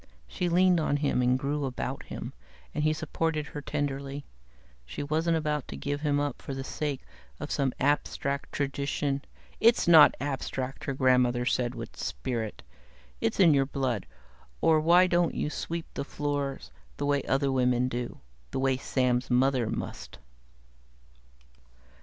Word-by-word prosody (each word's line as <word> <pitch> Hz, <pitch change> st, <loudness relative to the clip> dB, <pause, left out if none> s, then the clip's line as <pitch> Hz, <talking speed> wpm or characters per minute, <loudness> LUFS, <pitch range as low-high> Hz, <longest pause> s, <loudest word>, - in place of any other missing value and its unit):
She 175 Hz, -, -2 dB
leaned 180 Hz, 0 st, +4 dB
on 150 Hz, -2 st, +1 dB
him 140 Hz, -3 st, +1 dB
and 125 Hz, +1 st, +3 dB
grew 145 Hz, +2 st, -2 dB
about 130 Hz, -2 st, -4 dB
him, -, -, -6 dB, 0.4 s
and 150 Hz, -, -1 dB
he 155 Hz, -, +3 dB
supported 155 Hz, 0 st, -1 dB
her 150 Hz, 0 st, -7 dB
tenderly. 140 Hz, -1 st, -3 dB, 0.6 s
She 60 Hz, -, -6 dB
wasn't 160 Hz, +2 st, +1 dB
going 150 Hz, -1 st, 0 dB
to -, -, -7 dB
give 145 Hz, 0 st, -3 dB
him 145 Hz, -2 st, +1 dB
up 145 Hz, -3 st, -2 dB
for 135 Hz, -, -5 dB
the 135 Hz, -, -4 dB
sake 145 Hz, -1 st, -3 dB, 0.4 s
of 145 Hz, -, -5 dB
some 135 Hz, -3 st, +1 dB
abstract 140 Hz, 0 st, 0 dB
tradition 140 Hz, 0 st, -1 dB, 0.2 s
" -, -, -28 dB
it's 235 Hz, -, 0 dB
not 160 Hz, -3 st, +8 dB
abstract," 135 Hz, -1 st, -3 dB
her 140 Hz, -, -1 dB
grandmother 125 Hz, -2 st, +3 dB
said 125 Hz, -1 st, 0 dB
with -, -, -7 dB
spirit. 110 Hz, -, -4 dB, 0.6 s
"It's 115 Hz, -, -1 dB
in 170 Hz, -5 st, +7 dB
your 135 Hz, -1 st, +3 dB
blood. 130 Hz, -7 st, -2 dB, 0.5 s
Or 160 Hz, -1 st, +4 dB
why 170 Hz, +4 st, +6 dB
don't 175 Hz, -1 st, +2 dB
you 150 Hz, -, -1 dB
sweep 165 Hz, +1 st, -4 dB
the -, -, -3 dB
floors 145 Hz, -, -3 dB, 0.3 s
the 145 Hz, -, -2 dB
way 145 Hz, -1 st, +2 dB
other 135 Hz, 0 st, +1 dB
women 125 Hz, -1 st, +2 dB
do? 120 Hz, -, -4 dB, 0.3 s
The 130 Hz, -, -3 dB
way 135 Hz, -1 st, +2 dB
Sam's 125 Hz, -1 st, 0 dB
mother 125 Hz, -2 st, +2 dB
must?" 115 Hz, -, -5 dB
140 Hz, 155 wpm, -28 LUFS, 130-150 Hz, 0.6 s, not